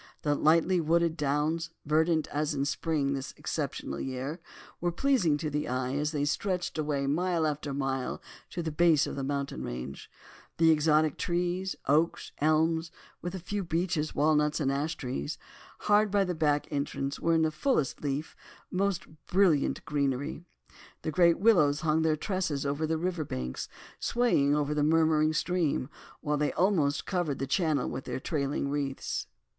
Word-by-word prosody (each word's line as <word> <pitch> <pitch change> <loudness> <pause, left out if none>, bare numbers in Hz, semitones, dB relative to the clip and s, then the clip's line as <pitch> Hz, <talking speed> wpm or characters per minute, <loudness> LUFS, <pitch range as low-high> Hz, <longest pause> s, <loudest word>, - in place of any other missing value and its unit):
The 145 - +2
lightly 165 +4 +3
wooded 165 +1 +2
downs, 150 +2 0 0.2
verdant 160 +1 +2
as 150 +1 -1
in 140 0 0
spring 145 -1 0
in - - +1
this 135 -1 -5
exceptional 70 - -3
year, 135 +5 -4 0.4
were 175 0 0
pleasing 180 - +2
to 150 0 -3
the 150 +1 -1
eye 130 +1 -1
as 150 +1 0
they 145 -2 0
stretched 180 +2 -1
away 145 -2 0
mile 170 +3 +1
after 150 -1 -2
mile 135 -2 -2 0.3
to 175 - -4
the 160 - -2
base 160 -1 +4
of - - -5
the 135 - -3
mountain 140 - -3
range. 60 +2 -6 0.5
The 165 0 +5
exotic 155 -1 +3
trees, 180 +2 -1
oaks 155 +4 +1
and 150 - +3
elms, 160 +1 +2 0.3
with 175 +2 -4
a - - -4
few 200 +3 -3
beeches, 165 -2 -1
walnuts, 150 0 +2
and 135 -3 +1
an 140 +1 0
ash 160 +2 -2
tree, 130 +2 -4 0.5
hard 210 0 +4
by 200 0 +3
the 180 -2 -1
back 150 -3 +1
entrance 140 -1 -2
were 165 0 +2
in 160 -1 +2
fullest 155 - 0
leaf, 145 +2 -3 0.4
most 190 0 0 0.2
brilliant 180 -7 +2
greenery. 140 +2 -1 0.6
The 155 - -1
great 170 0 +4
willows 175 -9 +4
hung 160 -1 +2
their 160 -1 +2
tresses 160 -6 -2
over 145 +3 -1
the 160 0 0
river 175 -1 -1
bank, 65 - -5 0.4
swaying 150 -13 +2
over 150 0 0
the 150 - 0
murmuring 155 0 +3
stream, 160 -5 0 0.3
while 150 0 0
they 150 0 +1
almost 165 -7 +2
covered 175 -7 -1
the 135 - -2
channel 155 -2 +1
with 130 - -5
their - - -3
trailing 140 -1 -1
wreaths. 140 - -3
155 Hz, 170 wpm, -29 LUFS, 145-170 Hz, 0.6 s, The